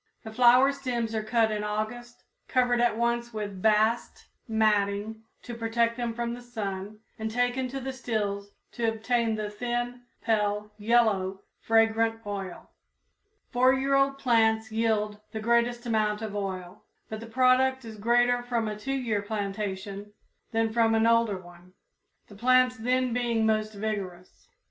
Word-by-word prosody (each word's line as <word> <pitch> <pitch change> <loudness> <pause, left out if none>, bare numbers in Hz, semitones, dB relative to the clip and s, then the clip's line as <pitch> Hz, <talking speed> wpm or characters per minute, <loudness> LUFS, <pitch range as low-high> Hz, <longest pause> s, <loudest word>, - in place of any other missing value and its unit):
The 220 - -8
flower 250 +3 +6
stems 245 -5 -3
are 220 - 0
cut 220 0 +1
in 210 -1 -2
August, 215 +3 -4 0.2
covered 245 -1 +2
at 240 -2 +2
once 235 0 -1
with 205 -3 -5
bast 220 +2 +1 0.2
matting 215 -1 +1 0.2
to 240 - -7
protect 230 0 0
them 235 -2 -3
from 235 0 -2
the 245 - -8
sun 210 -3 -6 0.2
and 220 0 -2
taken 245 +2 0
to 270 +2 -5
the 265 0 -5
stills 205 -6 -3 0.2
to 235 -1 -2
obtain 225 0 0
the 215 -1 -3
thin, 240 +2 -3 0.2
pale 210 -2 0
yellow, 205 -4 +2 0.2
fragrant 225 0 +2
oil. 195 -3 -6 0.8
Four 255 +1 +4
year 270 +1 0
old 275 0 +3
plants 220 -4 +2
yield 215 -2 0
the 220 - -3
greatest 235 +2 +1
amount 215 -2 0
of 210 -2 -5
oil, 190 -1 -5 0.2
but 220 - -6
the 230 - -9
product 260 +2 +3
is 220 -2 -9
greater 245 +2 +3
from 240 -2 -1
a 210 - -3
two 265 +6 -4
year 235 -6 -1
plantation 200 -1 -4 0.4
than 225 -1 0
from 225 -1 +3
an 225 0 +3
older 230 -3 +3
one, 175 0 -15 0.5
the - - -14
plants 255 +4 +3
then 250 +1 0
being 235 -2 +1
most 215 -1 0
vigorous. 200 -4 -5
225 Hz, 155 wpm, -27 LUFS, 210-240 Hz, 0.8 s, flower